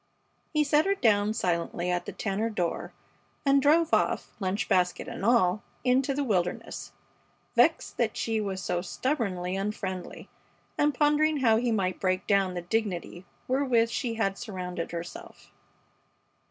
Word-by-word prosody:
He 305 -1 +3
set 300 +3 +3
her 395 - +3
down 210 - +3
silently 175 -1 -1
at 175 0 -2
the - - -3
Tanner 215 +2 -2
door 180 -6 -2 0.5
and 275 0 +5
drove 315 +3 +3
off, - - +1
lunch 200 +3 -1
basket 180 -3 +1
and - - -6
all, 210 -4 +3 0.2
into 260 +2 +2
the 285 - 0
wilderness, 180 -8 -2 0.6
vexed - - +3
that - - 0
she 225 -1 0
was 190 -2 -3
so 175 0 -1
stubbornly 190 - -2
unfriendly, 195 -2 -4 0.5
and 295 -1 +2
pondering 300 +1 +3
how 225 -3 +5
he 240 +1 0
might 190 -4 0
break 185 -1 0
down 195 -2 +2
the 175 - -4
dignity 185 -2 -3 0.2
wherewith 255 -3 +2
she 230 +2 -2
had 195 -3 -1
surrounded 180 -7 -5
herself. 170 +1 -8
210 Hz, 145 wpm, -28 LUFS, 185-255 Hz, 0.6 s, and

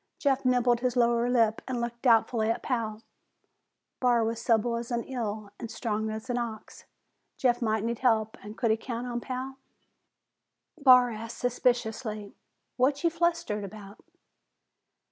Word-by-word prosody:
Jeff 275 -2 +1
nibbled 250 -1 +3
his 250 0 -1
lower 235 0 +3
lip 225 -3 +2
and 255 -2 -2
looked 235 0 -4
doubtfully 225 -2 +3
at 230 - -1
Pal. 225 -4 -2 1.0
Barr 240 -2 +3
was 225 +1 -2
supple 235 0 +2
as 235 0 -5
an 235 -1 -2
eel 215 -5 -4
and 230 - -6
strong 220 -2 -2
as 220 +2 -6
an 245 -1 -1
ox; 225 -2 -7 0.5
Jeff 245 -1 +2
might 220 -2 0
need 235 0 -2
help 220 -4 +2
and 210 +1 -9
could 230 -3 +2
he 220 - +2
count 235 +1 -5
on 240 -1 -3
Pal? 260 +1 -5 1.2
Barr 255 -5 +6
asked 225 +1 -7
suspiciously, 230 -4 -1 0.4
"What 275 +4 +2
ye 335 - +3
flustered 335 -10 0
about?" 200 +1 -10
235 Hz, 150 wpm, -28 LUFS, 220-250 Hz, 1.2 s, Barr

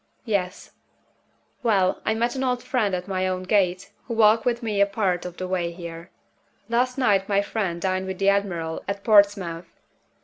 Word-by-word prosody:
"Yes." 200 -4 -2 0.9
"Well, 200 -6 +2
I 220 - +2
met 235 +2 0
an 265 - -2
old 250 -1 -1
friend 220 -7 0
at 180 +1 -5
my 185 -1 -1
own 185 0 -2
gate, 190 -1 +1 0.2
who 235 - -3
walked 220 0 +4
with 240 0 0
me 210 -3 0
a 200 - +5
part 195 -4 -1
of 180 -1 -7
the 185 - -4
way 180 -2 -1
here. 170 -1 -9 0.6
Last 250 +2 +1
night 200 -7 +2
my 200 0 +2
friend 195 -5 -2
dined 185 +1 -1
with 190 -1 -4
the 195 +1 +3
admiral 175 -5 -1
at 200 0 -4
Portsmouth. 200 -6 +2
200 Hz, 180 wpm, -24 LUFS, 185-220 Hz, 0.9 s, a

